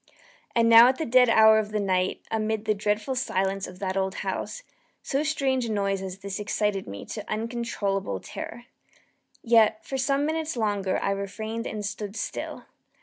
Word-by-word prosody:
And 230 -1 +4
now 230 +1 +9
at 260 +1 +2
the 320 - -2
dead 250 0 +5
hour 220 -1 +7
of 210 -1 -2
the 215 - 0
night, 185 -2 0
amid 220 -1 -1
the 215 - +2
dreadful 210 +4 -1
silence 195 -6 -1
of 180 - -11
that 190 -1 -3
old 190 0 -1
house, - - -4 0.4
so 275 - 0
strange 275 -5 0
a - - -3
noise 195 -2 0
as 190 -1 -6
this 200 +1 -5
excited 210 -1 -1
me 100 0 -7
to 210 - -7
uncontrollable 215 - -2
terror. 240 - -8 0.8
Yet, 225 -2 +4
for 270 - -3
some 275 +2 +1
minutes 315 -2 -2
longer 205 -4 0
I 195 - +1
refrained 215 +3 -4
and 210 -1 -4
stood 205 0 -5
still. - - -5
215 Hz, 175 wpm, -26 LUFS, 195-235 Hz, 0.8 s, now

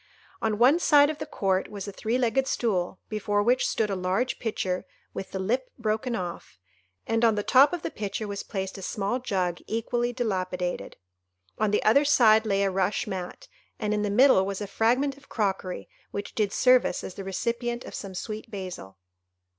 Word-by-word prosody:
On 220 -2 0
one 260 +9 +5
side 290 -3 +5
of 305 - -9
the - - -5
court 190 -1 0
was 205 -1 -6
a - - -4
three 220 +5 -1
legged 260 +2 +1
stool, 190 -8 -1
before 205 -1 0
which 245 +4 +3
stood 215 -2 0
a - - 0
large 190 +7 -1
pitcher 190 -5 -2 0.3
with 195 - -6
the - - -5
lip 240 +7 -1
broken 230 +2 -1
off, 175 - -6 0.5
and 225 +1 0
on 225 -2 +5
the 205 - -1
top 270 +6 +6
of 350 -2 -4
the - - -3
pitcher 205 +1 -4
was 200 0 -4
placed 190 -1 -5
a - - -8
small 205 +6 -2
jug 185 -8 -1
equally 240 +2 -1
dilapidated. 185 -7 -3 0.6
On 215 -1 +2
the 210 - +1
other 230 +7 +5
side 225 -6 +5
lay 200 -1 +2
a 195 - +1
rush 190 +4 0
mat, 190 - -6 0.3
and 210 -1 -1
in 210 - 0
the 205 - 0
middle 235 -1 +5
was 195 0 -3
a 210 - -3
fragment 250 +7 +1
of 280 - -20
crockery 195 -4 -2 0.2
which 200 0 -6
did 210 -3 0
service 250 -7 +3
as - - -6
the 195 - -7
recipient 235 +5 -2
of - - -9
some 195 -2 -6
sweet 215 +4 -6
basil. 180 - -7
210 Hz, 195 wpm, -27 LUFS, 195-240 Hz, 0.6 s, top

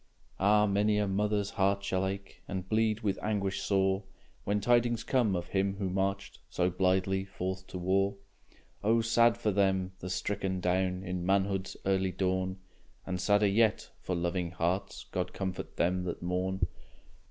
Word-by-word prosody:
Ah! 105 +2 +5
many 105 +1 +2
a 105 -1 +1
mother's 105 +1 0
heart 100 0 +1
shall 95 -1 0
ache, 95 0 -6
And 95 -1 -4
bleed 110 +1 +1
with 100 -3 -1
anguish 100 -2 -1
sore, 95 0 +2 0.4
When 105 +1 +1
tidings 120 +1 +2
come 115 -6 +2
of 85 0 -4
him 95 0 0
who 95 -2 -2
marched 95 +1 -2
So 90 0 +1
blithely 95 +1 +1
forth 95 -1 -5
to - - -6
war. 95 +2 +1 0.7
Oh! 115 +2 +4
sad 115 +1 +4
for 110 -3 0
them, 95 -2 +1
the 90 - -6
stricken 95 0 -2
down 90 +1 0
In 90 -2 -3
manhood's 95 0 0
early 95 -1 +2
dawn, 95 0 -1 0.5
And 90 -1 -3
sadder 105 +1 +4
yet 110 +2 +2
for 90 - -2
loving 85 0 -1
hearts. 90 +3 -2
God 90 -1 -2
comfort 95 -1 -4
them 90 +1 +1
that 85 -1 -4
mourn! 90 +2 -1
95 Hz, 160 wpm, -31 LUFS, 95-100 Hz, 0.7 s, Ah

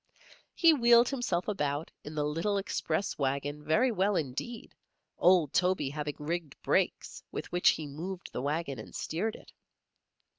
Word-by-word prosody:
He 330 -2 +6
wheeled 235 -3 +6
himself 240 -10 -1
about 150 -6 -2
in 150 - -8
the 150 - 0
little 165 +8 0
express 195 -2 -2
wagon 140 +2 -1
very 220 - +3
well 200 -1 +1
indeed, 160 - -4 0.5
old 175 -6 +4
Toby 180 -6 +1
having 150 0 -4
rigged 160 -1 -4
brakes - - 0
with - - -6
which 175 0 +4
he 155 - 0
moved 175 +6 -6
the - - -3
wagon 140 -2 -2
and 110 - -10
steered 215 +8 -2
it. - - -14
165 Hz, 150 wpm, -30 LUFS, 150-200 Hz, 0.5 s, He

